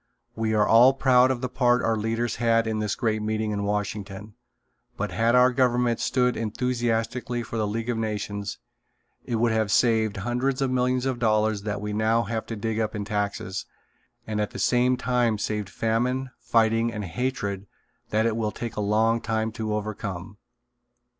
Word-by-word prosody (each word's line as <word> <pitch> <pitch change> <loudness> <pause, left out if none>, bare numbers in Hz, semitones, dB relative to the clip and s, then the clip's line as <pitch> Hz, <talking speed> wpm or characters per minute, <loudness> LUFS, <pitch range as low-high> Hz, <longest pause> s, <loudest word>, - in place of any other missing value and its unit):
We 110 -1 0
are 105 -1 +3
all 120 +4 +7
proud 130 -1 +4
of 130 -2 -1
the 130 - -1
part 125 -1 +2
our 115 - +2
leaders 115 +2 -1
had 115 -1 +2
in 110 -1 -1
this 105 -2 -1
great 110 -2 0
meeting 110 0 -1
in 100 -1 -2
Washington, 105 0 -4 0.6
but - - -2
had 115 +2 +2
our 125 +1 +6
government 125 -2 +2
stood 125 -1 +1
enthusiastically 120 +1 -1
for 115 - -6
the 110 -1 0
League 115 +2 -3
of 120 -2 -1
Nations 105 -2 -3 0.7
it 120 - -2
would 115 +1 +2
have 110 -2 0
saved 110 -3 +2
hundreds 125 +6 -1
of 135 -2 0
millions 125 0 +1
of 130 -2 -1
dollars 110 -2 +2
that 100 0 -3
we 105 0 -3
now 110 +2 +2
have 110 +2 -4
to 115 - -4
dig 110 +1 -2
up 110 0 -1
in 105 -1 -3
taxes, 100 -2 -3 0.6
and 105 -1 -2
at 105 - -1
the - - -9
same 125 +1 +2
time 125 -3 +1
saved 105 -1 -3
famine, 125 +5 -1
fighting 115 0 +2
and 105 -2 -5
hatred 100 0 -3 0.4
that 110 +1 +1
it 115 -1 +1
will 110 -2 -1
take 120 0 -6
a 105 - -2
long 110 +3 +2
time 110 -1 -1
to 110 -1 -4
overcome. 105 -2 -5
115 Hz, 180 wpm, -25 LUFS, 105-120 Hz, 0.7 s, all